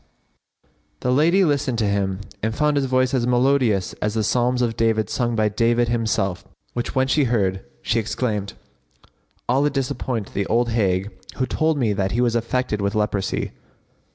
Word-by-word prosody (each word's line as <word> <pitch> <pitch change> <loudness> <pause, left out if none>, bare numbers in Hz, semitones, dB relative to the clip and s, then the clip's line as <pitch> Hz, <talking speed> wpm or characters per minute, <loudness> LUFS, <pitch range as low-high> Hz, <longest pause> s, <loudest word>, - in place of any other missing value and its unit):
[FN#56] - - -43 0.3
The 125 - 0
lady 170 +8 +4
listened 140 -5 0
to 110 - +1
him 100 -1 -1 0.2
and 110 +1 -1
found 150 +2 +2
his 140 -2 +1
voice 130 0 +1
as 120 -2 +1
melodious 125 -6 +2
as 105 +1 -1
the 110 - +1
psalms 125 +3 +1
of 115 -2 -1
David 110 -3 +1
sung 120 -2 0
by 110 -1 +2
David 115 +2 +1
himself,[FN#57] 110 -6 -1 0.2
which 120 -1 -4
when 130 0 +2
she 140 +1 +2
heard, 95 -6 0 0.2
she 115 - +1
exclaimed, 105 -2 -2 0.9
"Allah 135 +4 +3
disappoint 130 -5 -3
the 100 0 -1
old 120 +2 +1
hag 100 -3 0 0.2
who 130 - 0
told 155 +3 0
me 115 -6 +1
that 95 -1 -1
he 120 - 0
was 120 -2 +2
affected 115 -2 -1
with 100 +1 -1
leprosy! 105 -2 -1
115 Hz, 175 wpm, -22 LUFS, 105-130 Hz, 0.9 s, lady